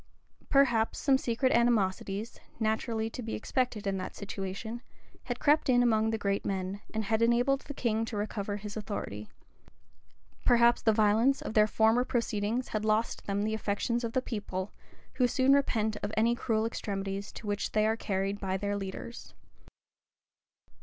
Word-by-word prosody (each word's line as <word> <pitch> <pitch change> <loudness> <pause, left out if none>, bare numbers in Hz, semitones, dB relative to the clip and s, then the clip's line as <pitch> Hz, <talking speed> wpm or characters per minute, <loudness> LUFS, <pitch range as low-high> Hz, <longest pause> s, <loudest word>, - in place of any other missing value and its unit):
Perhaps 240 -6 +3
some 270 -2 +3
secret 255 +2 +1
animosities, 215 -2 +1 0.2
naturally 220 0 0
to 250 - -6
be 225 -1 -4
expected 245 -2 -1
in 195 -1 0
that 185 - -5
situation, 200 +4 -5 0.4
had 245 -1 -3
crept 295 -1 +3
in 245 -1 +5
among 220 -2 +3
the 225 - 0
great 200 -1 -1
men, 195 +1 -3
and 220 0 -2
had 220 +2 0
enabled 245 +4 +3
the 285 - -8
king 225 -3 0
to 225 - -5
recover 205 -1 -3
his 210 0 -7
authority. 155 - -5 1.1
Perhaps 235 0 +5
the 220 - +4
violence 220 +5 +3
of - - -5
their 215 -1 +5
former 220 +3 +3
proceedings 235 -1 -1
had 215 -1 -2
lost 220 +1 0
them 200 0 0
the 220 +1 -1
affections 220 +3 -1
of 230 -1 -3
the 255 - +1
people, 205 -5 -4 0.4
who 250 - +3
soon 260 +2 +3
repent 220 -6 +1
of 205 - -3
any 230 +2 +4
cruel 225 -2 0
extremities 200 -3 -4
to - - -9
which 205 -1 -2
they 215 0 +3
are 220 +1 +2
carried 195 -2 -2
by 190 -1 -1
their 205 +1 -2
leaders. 200 +4 -7
220 Hz, 165 wpm, -30 LUFS, 205-235 Hz, 1.1 s, in